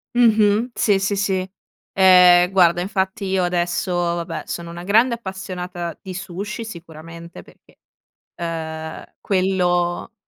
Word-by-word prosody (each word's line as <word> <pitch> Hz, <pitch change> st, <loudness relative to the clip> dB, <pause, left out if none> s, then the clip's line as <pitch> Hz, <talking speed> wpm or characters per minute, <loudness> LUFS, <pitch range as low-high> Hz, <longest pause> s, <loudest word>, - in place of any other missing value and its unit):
Mh-mh, 220 Hz, 0 st, +3 dB
sì, 205 Hz, -3 st, +2 dB
sì, 195 Hz, +1 st, -1 dB
sì, 190 Hz, -2 st, -1 dB, 0.4 s
ehm, 180 Hz, -2 st, +6 dB
guarda, 175 Hz, -2 st, +3 dB
infatti 190 Hz, +1 st, -2 dB
io 190 Hz, -1 st, 0 dB
adesso, 175 Hz, +1 st, -1 dB
vabbè, 170 Hz, -1 st, -2 dB
sono 170 Hz, 0 st, -6 dB
una 175 Hz, +1 st, -8 dB
grande 225 Hz, +6 st, +3 dB
appassionata 185 Hz, -5 st, -6 dB
di 185 Hz, -2 st, -8 dB
sushi, 195 Hz, +5 st, -6 dB
sicuramente, 170 Hz, -3 st, -11 dB
perché, -, -, -23 dB, 0.6 s
ehm, 160 Hz, -2 st, -6 dB, 0.2 s
quello 180 Hz, 0 st, 0 dB
180 Hz, 115 wpm, -20 LUFS, 175-195 Hz, 0.6 s, ehm